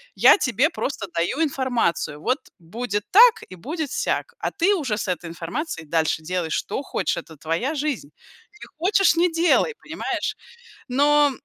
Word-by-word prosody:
Я - - +7
тебе 255 +4 +2
просто 275 -9 -3
даю 175 - 0
информацию, 245 - -1
вот 255 - 0 0.2
будет 205 +4 -4
так 470 +4 +7
и 185 - -9
будет 300 - -5
сяк. - - -2
А - - -1
ты 380 +5 +2
уже 265 - -2
с 210 - -3
этой 180 -2 -3
информацией 170 - -5
дальше 160 0 0
делай, 175 0 -2
что 160 - -2
хочешь, - - -2
это 160 -2 -9
твоя 165 - -2
жизнь. 285 - -2 0.5
Не - - -9 0.2
хочешь, 390 -4 +4
не 350 +2 +4
делай, 345 +7 +2
понимаешь?" - - -3 0.5
Но, 290 +2 +4
250 Hz, 155 wpm, -23 LUFS, -, 0.5 s, Я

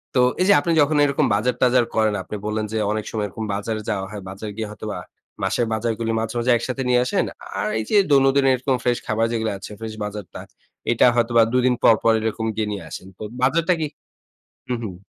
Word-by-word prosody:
তো - - +4 0.2
এই - - +4
যে - - +8
আপনি 165 +4 -1
যখন 150 +1 +2
এইরকম 140 -1 +2
বাজার-টাজার 125 +2 +2
করেন, 110 -1 +2
আপনি 105 - -7
বললেন 105 0 -1
যে - - 0
অনেক 110 0 -2
সময় 105 -2 -1
এরকম 110 +3 -6
বাজারে 110 +2 -3
যাওয়া 95 -3 -1
হয়। 105 -2 -6
বাজারে 105 +2 -7
গিয়ে 110 -2 -3
হয়তোবা 105 0 -6 0.4
মাসের 110 +5 +1
বাজারগুলি 115 0 -1
মাঝে, 110 +1 -3
মাঝে 120 +1 +2
একসাথে 130 +3 -4
নিয়ে 125 0 +4
আসেন। - - +1 0.3
আর - - -1
এই - - -2
যে 210 - +4
দৈনন্দিন 135 0 +4
এরকম 130 +1 0
ফ্রেশ 120 -1 +2
খাবার 110 +1 +1
যেগুলো 110 -2 -1
আছে 105 - -9
ফ্রেশ 110 -1 -6
বাজারটা, 105 -3 -7 0.5
এইটা 120 - +4
হয়তো 120 0 +1
বা 115 - +8
২ 125 - +4
দিন 125 - +3
পর, 115 - +7
পর 115 - +5
এইরকম 110 +1 -2
গিয়ে 110 -1 -1
নিয়ে 100 -3 -5
আসেন। 95 - -8
তো - - -8 0.2
বাজারটা 165 +6 +3
কি 155 - 0 0.8
হুম, 120 -2 -1
হুম। 95 -2 -7
115 Hz, 215 wpm, -22 LUFS, 105-125 Hz, 0.8 s, যে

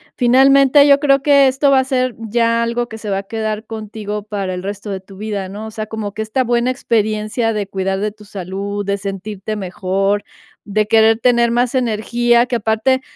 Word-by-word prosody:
finalmente, 275 +3 +5
yo 280 0 +6
creo 275 -2 +3
que 280 -1 +5
esto 270 +2 +2
va 275 - +5
a - - +2
ser 255 -2 -1
ya 230 +1 0
algo 235 +1 -2
que 220 - -8
se 210 -2 -5
va 195 - 0
a - - -7
quedar 220 +1 -4
contigo 210 -1 -6
para 195 -3 -4
el 180 - -6
resto 200 +1 -6
de 195 -1 -3
tu 190 0 -15
vida, 205 -2 -4
¿no? 210 +3 -7
O - - -9
sea, 215 0 -5
como 215 -2 -5
que 220 - -2
esta 235 +4 -1
buena 240 +1 +1
experiencia 220 -1 -1
de 205 -2 -3
cuidar 190 0 -2
de 210 0 -1
tu 210 0 -17
salud, 200 +1 -5
de 200 0 -1
sentirte 200 +1 -5
mejor, 195 +1 -1 0.4
de 210 +1 -1
querer 225 0 +4
tener 235 -1 +3
más 240 +2 0
energía, 240 0 +1
que 250 - -2
aparte, 225 +4 +1
220 Hz, 205 wpm, -17 LUFS, 205-240 Hz, 0.4 s, yo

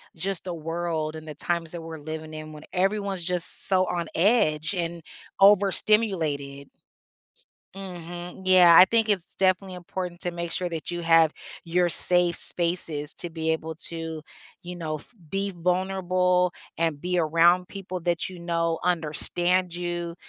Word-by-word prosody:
just 190 +2 -2
the 180 - -4
world 165 -1 -3
and 155 0 -11
the 150 - -7
times 170 +1 -2
that 170 - -6
we're 160 -1 -8
living 155 +1 -7
in 155 0 -8
when 150 0 -11
everyone's 195 -1 -1
just 180 -1 +2
so 185 -1 +3
on 170 -2 -2
edge 165 -4 +2
and 170 -1 -3 0.4
overstimulated. 190 -8 +3 1.1
Mhm, 175 -1 -8
yeah, 180 -2 +7
I 185 - +10
think 225 +1 +1
it's 190 -4 -1
definitely 185 0 +1
important 180 -1 -6
to 175 -2 -1
make 170 0 -5
sure 180 -1 -2
that 165 -2 -4
you 175 0 -3
have 165 -1 +5 0.3
your 175 +1 +1
safe 175 0 +3
spaces 165 -4 +1
to 175 - -3
be 160 0 -2
able 160 0 -3 0.2
to, 165 -1 -6 0.4
you 180 0 -7
know, 160 -3 -4
f 155 - -11 0.2
be 195 0 -2
vulnerable 180 0 +1 0.3
and 160 -3 0
be 180 +1 -1
around 170 +3 +3
people 185 -2 -6
that 170 -1 0
you 185 -2 -9
know 165 -1 -1
understand 175 +2 0
you, 175 -1 -4
175 Hz, 155 wpm, -25 LUFS, 165-185 Hz, 1.1 s, I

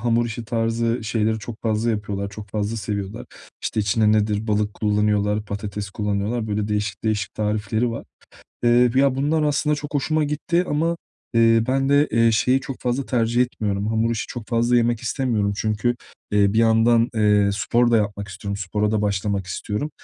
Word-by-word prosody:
hamur 120 0 +1
işi 115 0 -6
tarzı 115 0 -1
şeyleri 110 0 0
çok 110 0 -9
fazla 110 +1 0
yapıyorlar, 100 -2 -3
çok 105 +1 -9
fazla 105 +1 -2
seviyorlar. 105 0 -4 0.4
İşte, 110 - -1
içine 105 +1 +2
nedir, 105 0 +1
balık 105 -1 0
kullanıyorlar, 105 0 +1
patates 100 -1 -5
kullanıyorlar. 105 +3 -2
Böyle, 105 0 -1
değişik 105 0 -2
değişik 105 -4 -1
tarifleri 110 +2 -1
var. 115 - -6 0.6
Iıı, 120 0 +4
b 130 - +4
ya, 140 -1 +3
bunlar 150 +4 +1
aslında 150 0 +1
çok 145 0 -7
hoşuma 155 +2 +1
gitti 170 +4 0
ama, 165 +3 0 0.4
ııı, 115 0 +4
ben 135 +1 +1
de, 145 +1 +4
eee, 115 0 +3
şeyi 125 +4 +2
çok 135 -1 -7
fazla 125 +2 -1
tercih 120 0 +2
etmiyorum. 105 -4 -2
Hamur 110 +1 +1
işi 115 - -3
çok 120 -3 -7
fazla 120 +1 +2
yemek 120 -1 +2
istemiyorum 115 -5 0
çünkü, 110 +3 0 0.4
eee, 100 -1 +3
bir 110 - +1
yandan, 115 +1 +4
eee, 105 -2 +3
spor 120 +4 +1
da 115 - +5
yapmak 100 -1 -2
istiyorum. 100 +1 -5
Spora 105 +2 -1
da 105 - +1
başlamak 100 -1 -1
istiyorum. 105 +9 -3
110 Hz, 175 wpm, -22 LUFS, 105-120 Hz, 0.6 s, da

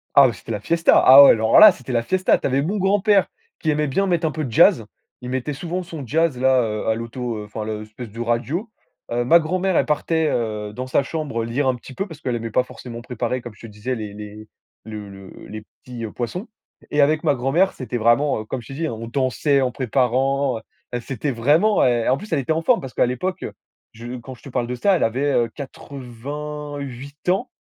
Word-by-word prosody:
Ah, 135 -3 +7
c'était 95 +3 -10
la 105 - -2
fiesta, 165 +10 +3
ah 135 +2 +10
ouais, - - +9
alors 110 0 +4
là, 215 -2 +11
c'était 130 -5 -9
la 120 - +2
fiesta, 185 +10 +2
tu - - -1
avais 135 +1 +1
mon 195 +7 -1
grand 195 +1 +2
père 200 -1 +3 0.3
qui 155 - -2
aimait 150 0 +1
bien 195 +9 0
mettre 175 -3 +1
un 155 - +1
peu 155 +1 -4
de 130 - -5
jazz, 165 - +5 0.4
il 125 - -7
mettait 130 +3 -2
souvent 175 +5 -4
son 160 -6 -8
jazz 155 -1 +1
là, 130 0 +4
heu, 105 -1 -3
à 110 - +2
l'auto 115 -1 -5
enfin 105 +1 -6
l'espèce 110 +2 -7
de 115 +3 -11
radio. 120 - -2 0.4
Heu, 120 +1 0
ma 170 +7 +6
grand-mère, 185 +3 0
elle - - +3
partait, 160 +1 0
heu, 105 -3 -3
dans 130 +3 -5
sa 135 +2 +2
chambre, 145 -6 -3
heu, - - -3
lire 130 +4 -1
un 130 - +2
petit 125 +2 -12
peu 195 +9 -3
parce 160 -4 -12
qu'elle 125 -4 -2
aimait 115 0 -4
pas 125 - +2
forcément 120 -2 -9
préparer, 125 +1 -3
comme 120 -2 -9
je - - -19
te 115 - -9
disais, 105 +4 -5
les 105 -2 -6
les 105 +1 -10 0.4
le 105 -2 -8
le 95 -1 -12
les 110 0 -7 0.2
petits, 120 -2 -7
heu, 110 - -7
poissons. 175 - -5 0.4
Et 145 - +2
avec 150 +2 +2
ma 150 -3 +2
grand 130 +1 -2
mère, 185 +6 +3
c'était 125 -2 -5
vraiment, 120 +4 +2
heu, 110 - -10
comme 130 +3 -4
je 115 - -15
t'ai - - -8
dit, 160 +4 -2
hein, - - -4
on 115 +1 -7
dansait 135 +3 +1
en 130 -1 0
préparant, 130 +1 0 0.4
c'était 135 +3 -3
vraiment 150 - +3
et 120 -2 +1
en 130 - +3
plus, 210 +2 -10
elle 150 - +2
était 135 +3 -2
en 160 - -1
forme 250 -3 +3
parce 135 -2 -8
qu'à - - +3
l'époque 125 +10 -3 0.5
je 120 +2 -8
quand 130 +2 -9
je - - -22
te - - -9
parle 120 -2 -2
de 125 - -3
ça, 190 +10 +2
elle - - 0
avait, 135 +6 0
heu, 120 -1 +2
88 140 +2 -7
ans, 235 +7 0
130 Hz, 240 wpm, -21 LUFS, 115-155 Hz, 0.5 s, là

